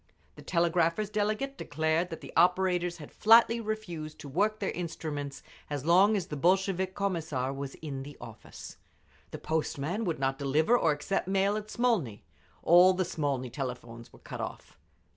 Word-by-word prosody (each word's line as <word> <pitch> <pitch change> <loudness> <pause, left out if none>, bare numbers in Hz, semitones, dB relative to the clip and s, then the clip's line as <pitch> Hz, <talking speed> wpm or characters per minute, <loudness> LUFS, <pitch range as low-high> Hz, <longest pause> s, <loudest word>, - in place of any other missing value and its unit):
The - - -13
Telegraphers' 170 +3 +1
delegate 215 +7 -1
declared 160 +2 0
that 165 - -7
the - - -10
operators 180 0 +2
had 150 -3 -11
flatly 230 +1 +5
refused 175 -8 -5
to - - -9
work 205 +10 0
their 200 - -2
instruments 155 -5 -5 0.3
as 145 -2 -4
long 190 +6 +5
as 185 - -3
the 150 - -6
Bolshevik 190 +3 +1
Commissar 160 -9 -2
was 140 0 -6
in 140 -3 -5
the 145 +2 -10
office. - - -11 0.5
The - - -7
Postmen 160 +5 -2
would 170 -3 -1
not 135 0 -1
deliver 150 - +2
or 165 -10 +3
accept 150 +6 -2
mail 195 +1 +2
at 215 0 -5
Smolny…. 215 - 0 0.4
All 180 +2 +6
the 185 0 0
Smolny 140 -7 -2
telephones 120 -3 -6
were - - -16
cut - - -8
off. - - -7
170 Hz, 160 wpm, -29 LUFS, 145-195 Hz, 0.5 s, All